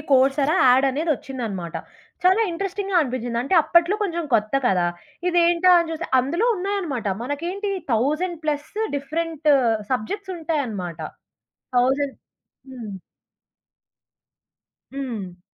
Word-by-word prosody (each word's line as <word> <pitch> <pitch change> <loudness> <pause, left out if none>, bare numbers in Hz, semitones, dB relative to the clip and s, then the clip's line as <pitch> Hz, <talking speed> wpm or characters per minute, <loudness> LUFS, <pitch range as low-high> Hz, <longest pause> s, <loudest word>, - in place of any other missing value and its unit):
Course 270 +2 +4
ఎరా 310 +6 +2
add 255 +2 +5
అనేది 310 +5 -1
ఒచ్చిందనమాట. 215 -12 -5 0.5
చాలా 375 +4 +5
ఇంట్రెస్టింగ్‌గా 390 +2 -2
అనిపించింది. 245 -3 -3
అంటే 275 +9 0
అప్పట్లో 340 +6 +3
కొంచెం 345 -4 -2
కొత్త 215 +2 +1
కదా! 180 -5 +2 0.4
ఇదేంటా 345 +1 +4
అని 335 -1 -1
చూస్తే, 325 +2 -5
అందులో 340 - 0
ఉన్నాయనమాట. 360 - -2 0.2
మనకేంటి 345 - -3 0.2
1000 305 +10 0
ప్లస్ 295 -1 -2 0.3
డిఫరెంట్ 310 +2 -3 0.4
సబ్జెక్ట్స్ 380 - -3
ఉంటాయనమాట. 230 - -3 0.8
1000 270 +3 +2 0.6
హ్మ్. 235 -5 -7 2.0
హ్మ్. 215 -10 -5
290 Hz, 105 wpm, -23 LUFS, 245-345 Hz, 2.0 s, add